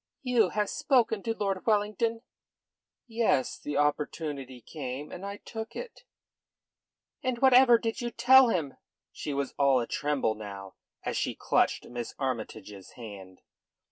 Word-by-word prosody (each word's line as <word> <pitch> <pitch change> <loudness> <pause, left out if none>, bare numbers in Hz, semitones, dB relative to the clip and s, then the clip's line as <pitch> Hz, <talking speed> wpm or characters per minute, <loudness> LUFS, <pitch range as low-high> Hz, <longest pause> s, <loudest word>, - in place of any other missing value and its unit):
"You 240 -7 +3
have 210 +1 0
spoken 235 -6 +2
to 225 +1 -2
Lord 195 -3 -1
Wellington?" 220 +2 +1 0.8
"Yes. 225 - 0
The 145 - -4
opportunity 145 -3 -2
came, 135 +2 -6
and 180 - -8
I 200 +1 -5
took 225 +2 -8
it." - - -8 1.2
"And 255 -3 -1
whatever 255 -1 +7
did 225 0 -3
you 240 - -2
tell 260 +1 +6
him?" 160 -10 -2 0.3
She 150 - -5
was 140 -1 -2
all 140 -2 +4
a 120 - -1
tremble 145 -4 0
now, 100 -3 -8 0.3
as - - -2
she - - -1
clutched - - +1
Miss 120 -1 -6
Armytage's 110 -6 -5
hand. 100 -6 -10
165 Hz, 140 wpm, -29 LUFS, -, 1.2 s, whatever